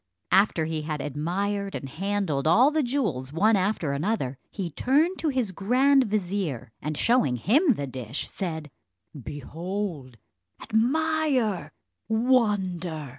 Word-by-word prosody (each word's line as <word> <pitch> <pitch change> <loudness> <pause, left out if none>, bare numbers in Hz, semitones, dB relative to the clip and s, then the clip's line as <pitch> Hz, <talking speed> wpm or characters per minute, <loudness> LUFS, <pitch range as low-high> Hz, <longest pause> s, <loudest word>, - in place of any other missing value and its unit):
After 190 -5 +4
he 160 -1 -2
had 150 -1 -4
admired 195 +8 -2
and 135 - -5
handled 170 -2 -1
all 245 - +6
the 310 0 +1
jewels 210 - -1
one 210 +8 +3
after 185 -6 0
another, 140 - -2
he 180 -4 -5
turned 295 - +2
to 320 - 0
his 255 -7 -1
grand 255 +8 +3
vizier, 185 - -2
and 150 0 -3
showing 235 - +3
him 250 - +3
the 145 - -3
dish, 130 -1 -5
said, 160 -6 -5 0.4
"Behold, 150 - -5 0.4
admire, 265 - +1 0.4
wonder! 195 - +1
195 Hz, 125 wpm, -26 LUFS, 150-235 Hz, 0.4 s, all